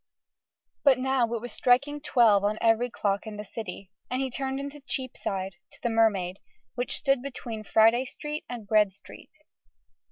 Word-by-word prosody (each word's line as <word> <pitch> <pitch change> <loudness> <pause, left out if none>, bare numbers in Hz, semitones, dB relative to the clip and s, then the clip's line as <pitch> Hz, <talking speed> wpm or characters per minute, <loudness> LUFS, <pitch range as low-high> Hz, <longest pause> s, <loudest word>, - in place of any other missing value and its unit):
But 275 -3 +6
now 255 -2 +1
it 235 -2 -2
was 245 - -6
striking 280 +4 +2
twelve 230 -8 +4
on 210 +1 +1
every 230 +2 +3
clock 200 -2 -1
in 210 -1 -6
the 210 - -5
City, 195 -3 -7 0.2
and 255 - -1
he 265 -1 -1
turned 265 +1 -3
into 280 +1 -7
Cheapside 195 -7 -3 0.2
to - - -15
the 235 - +1
Mermaid, 200 -5 +2 0.4
which 245 0 -1
stood 275 -3 +2
between 245 -5 -6
Friday 225 +4 +4
Street 300 +3 -6
and 240 -3 -6
Bread 210 -2 +4
Street. - - -13
235 Hz, 165 wpm, -27 LUFS, 210-265 Hz, 0.4 s, But